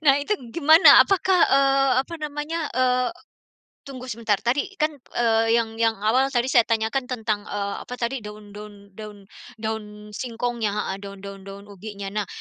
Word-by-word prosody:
Nah, 275 -2 +6
itu 420 - 0 0.2
gimana? 320 +2 +8
Apakah, 380 -2 +1
eee, 275 0 +3
apa 335 - -9
namanya, 300 +2 -4
eee, 255 -1 +2 0.8
tunggu 260 -2 -9
sebentar 225 -4 -1
tadi 275 +11 -1
kan, 305 0 +1 0.2
eee, 225 -1 +2
yang 225 -1 -1
yang 225 -1 +2
awal 245 +6 +2
tadi 245 -1 0
saya 240 -3 +5
tanyakan 230 +4 0
tentang, 220 -4 -2
eee, 200 -1 -3
apa 250 - -8
tadi 235 0 -3
daun 210 -1 -11
daun 205 -1 -12
daun 210 -2 -11 0.3
daun 220 0 -3 0.3
singkongnya, 235 -2 -3
heeh, 210 -2 -3
daun 200 0 -9
daun 200 -1 -9
daun 200 0 -10
ubinya. 200 0 -8
Nah, 210 -2 -2
230 Hz, 165 wpm, -23 LUFS, 210-270 Hz, 0.8 s, gimana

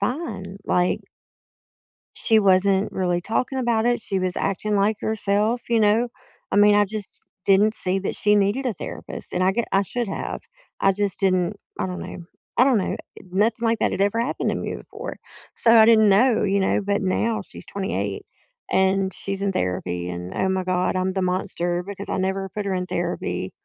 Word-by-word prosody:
fine. 200 - -3
Like 180 0 +1 1.2
she 220 -2 +3
wasn't 195 0 +3
really 180 -2 0
talking 250 +7 -1
about 235 -2 +1
it, 240 -1 +2
she 195 -3 -2
was 185 -1 -1
acting 205 +2 -1
like 205 +2 +2
herself, 215 +2 0
you 230 -1 +3
know? 215 +3 +3 0.4
I - - +2
mean, 205 0 +6
I 205 0 +5
just 210 0 -6 0.3
didn't 205 +3 +4
see 185 +1 +1
that 195 - -3
she 210 0 +3
needed 205 +7 +1
a 230 - -1
therapist, - - -7
and 180 - 0
I 190 - +3
get 235 +2 -1
I 195 +1 +4
should 235 +3 -3
have. - - -4 0.4
I 195 - +4
just 205 0 -1
didn't 185 0 +1 0.2
I - - -1
don't 180 0 -5
know, 170 - -8 0.3
I 250 - +6
don't 260 -5 +4
know. 190 - -2 0.3
Nothing 215 +4 +1
like 225 0 +2
that - - +1
had - - -3
ever 205 +3 +2
happened 245 - -1
to - - -1
me - - -4
before. - - -8 0.4
So, 230 0 +5
I 220 0 +8
didn't 220 -2 +6
know, 220 +4 +4
you 200 0 +2
know? 190 - +2
But 200 0 0
now 220 +4 0
she's - - -11
28 100 - -3 0.5
and 190 0 +2
she's 195 0 -5
in 200 -1 0
therapy, 90 - -2
and, 90 +1 -6
oh 190 - 0
my 190 -1 0
god, 185 0 0
I'm 185 0 0
the 190 -1 -1
monster 180 -1 -1
because 200 0 -7
I - - -1
never 190 +1 -1
put 210 +1 -4
her 190 - 0
in 180 0 -2
therapy. - - -3
200 Hz, 200 wpm, -23 LUFS, 185-220 Hz, 1.2 s, I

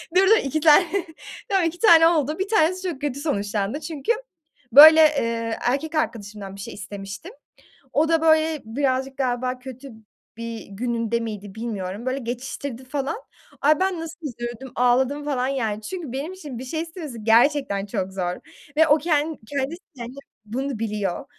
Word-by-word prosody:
Dur, 375 - +7
dur 445 +1 +7
2 280 +3 -1
tane 320 +3 +7 0.6
tamam, 385 -4 +2
2 330 +2 -3
tane 330 -7 +7
oldu 310 -1 +1
1 385 - -1
tanesi 370 -1 +2
çok 295 -5 -7
kötü 285 -2 -2
sonuçlandı. 205 -4 -2
Çünkü 315 - -2 0.6
böyle, 315 +3 +11
eee, 230 -7 +2
erkek 285 +6 -1
arkadaşımdan 205 -9 -3
bir 200 - -9
şey - - -7
istemiştim. 205 - -8 0.6
O 315 +3 +2
da, 325 -1 +3
böyle, 315 -1 +3
birazcık 265 +2 -1
galiba 250 -1 -1
kötü 260 +1 -10 0.5
bir 230 -1 -6
gününde 230 +2 -1
miydi 210 -3 -6
bilmiyorum? 215 -1 -5
Böyle 260 +1 -1
geçiştirdi 255 +1 -5
falan. 285 - -3 0.4
Ay, 300 +1 +4
ben 375 -3 0
nasıl 325 0 -7
üzüldüm, 240 +1 -7
ağladım 260 +4 +2
falan 260 -3 0
yani. 225 -6 -2
Çünkü 325 - -6
benim 285 +8 -4
için 290 -10 -8
bir 260 - -7
şey 315 +5 -3
istemesi 320 - -7
gerçekten 230 -2 +3
çok 195 -2 -3
zor 180 -2 -2 0.4
ve 320 0 +6
o 295 - +6
ken 305 -1 0
kendisi 285 +5 -3 0.2
kendi 240 +2 -8 0.3
bunu 260 +3 -3
biliyor 210 -5 -2
265 Hz, 160 wpm, -23 LUFS, 230-315 Hz, 0.6 s, böyle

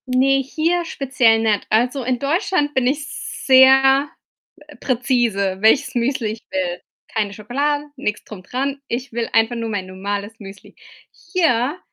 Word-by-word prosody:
Ne, 270 +2 +3
hier 325 +6 -1
speziell 255 -7 +2
nicht. 215 -2 0
Also, 245 +5 +1
in 250 +1 0
Deutschland 305 - 0
bin 260 -3 +1
ich 285 +2 -1
sehr, 270 +1 +4 0.6
äh, 295 - -14
präzise, 235 -7 0
welches 220 +6 +3
Müsli 240 -1 -1
ich 220 +1 -11
will. 180 -2 -2 0.3
Keine 210 -2 -2
Schokolade, 280 +8 -2
nix 210 -6 -3
drum 200 -4 -10
dran. 270 +7 -3
Ich 245 +2 -4
will 230 0 -2
einfach 225 +2 +2
nur 230 -1 -4
mein 200 -3 -3
normales 200 +3 -5
Müsli. 195 -1 -12 0.4
Hier 310 -4 0
250 Hz, 145 wpm, -20 LUFS, 220-275 Hz, 0.6 s, sehr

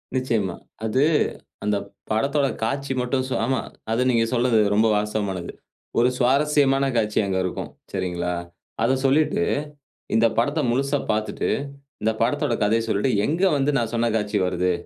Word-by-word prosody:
நிச்சயமா. 115 -8 0 0.3
அது 130 +6 +2 0.6
அந்த 105 -1 +1 0.3
படத்தோட 140 +5 +2 0.2
காட்சி 135 +3 -1
மட்டும். 130 +1 0
ஸோ, - - -1
ஆமா. 130 -2 0 0.3
அது 115 +3 +1
நீங்க 115 -1 +3
சொல்றது 120 -2 +3 0.2
ரொம்ப 110 +1 +4
வாஸ்தவமானது. 100 -4 -2 0.5
ஒரு 125 +2 +4
சுவாரஸ்யமான 140 +1 +3
காட்சி 105 -1 +1
அங்க 95 -1 -1
இருக்கும். 90 - -4 0.2
சரிங்களா? 90 -1 -2 0.5
அத 120 - +3
சொல்லிட்டு 155 +10 +3 0.7
இந்த 115 +1 +4
படத்த 145 +7 +1
முழுசா 140 +3 +1
பார்த்துட்டு, 110 0 -1 0.5
இந்த 110 +1 +2
படத்தோட 120 0 +1
கதைய 115 +2 +2
சொல்லிட்டு 110 +5 +1
எங்க 165 +5 -1 0.2
வந்து 140 +2 +2
நான் 115 -1 -1
சொன்ன 115 0 +1
காட்சி 105 -1 0
வருது? 90 0 0
115 Hz, 140 wpm, -23 LUFS, 105-135 Hz, 0.7 s, ரொம்ப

